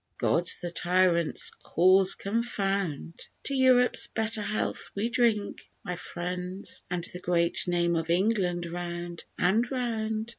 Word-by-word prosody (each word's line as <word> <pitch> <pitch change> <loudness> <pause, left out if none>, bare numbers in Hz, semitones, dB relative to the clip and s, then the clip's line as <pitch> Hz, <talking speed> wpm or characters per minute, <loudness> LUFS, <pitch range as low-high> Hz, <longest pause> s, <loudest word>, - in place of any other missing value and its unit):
God 170 0 +1 0.2
the 175 - -3
tyrant's 175 -1 +2
cause 185 +2 +4
confound! 195 -7 -2 0.2
To 275 - -2
Europe's 255 -2 +4
better 220 0 -2
health 210 +1 -2
we 210 +4 -1
drink, 230 -4 0
my 180 - -4
friends, 180 +2 -4
And 175 -1 -2
the 180 - -5
great 170 -1 +1
name 170 -1 +1
of 165 0 -2
England 180 -1 +1
round 175 0 -5
and 220 +7 +2
round. 225 -3 -2
185 Hz, 125 wpm, -28 LUFS, 175-220 Hz, 0.2 s, cause